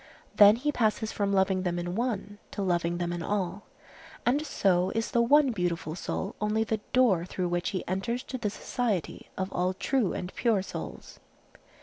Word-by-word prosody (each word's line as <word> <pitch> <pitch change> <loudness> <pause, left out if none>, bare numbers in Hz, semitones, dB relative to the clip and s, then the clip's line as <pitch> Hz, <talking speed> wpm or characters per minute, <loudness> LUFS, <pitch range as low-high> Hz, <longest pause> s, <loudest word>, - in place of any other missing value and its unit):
Then 205 0 +8
he 285 +5 -1
passes 220 -4 0
from 200 -1 -1
loving 190 -1 +2
them 175 -1 -1
in 175 0 -3
one 205 -2 -2
to 200 - -4
loving 175 -2 0
them 175 0 -2
in 175 - -4
all, 195 +2 -2 0.6
and 275 +5 +2
so 185 - +2
is 225 0 -1
the 235 - +3
one 280 +3 +5
beautiful 175 -6 -2
soul 190 +3 -4
only 210 +1 +1
the 220 0 -1
door 230 -10 +4
through 180 0 -3
which 175 +2 -1
he 190 -4 -4
enters 235 +7 -2
to 260 - -6
the 210 - -1
society 215 -3 -3
of 190 +1 -3
all 180 +1 0
true 250 -3 +1
and 180 +1 -5
pure 220 -6 +1
souls. - - -8
200 Hz, 185 wpm, -28 LUFS, 180-230 Hz, 0.6 s, Then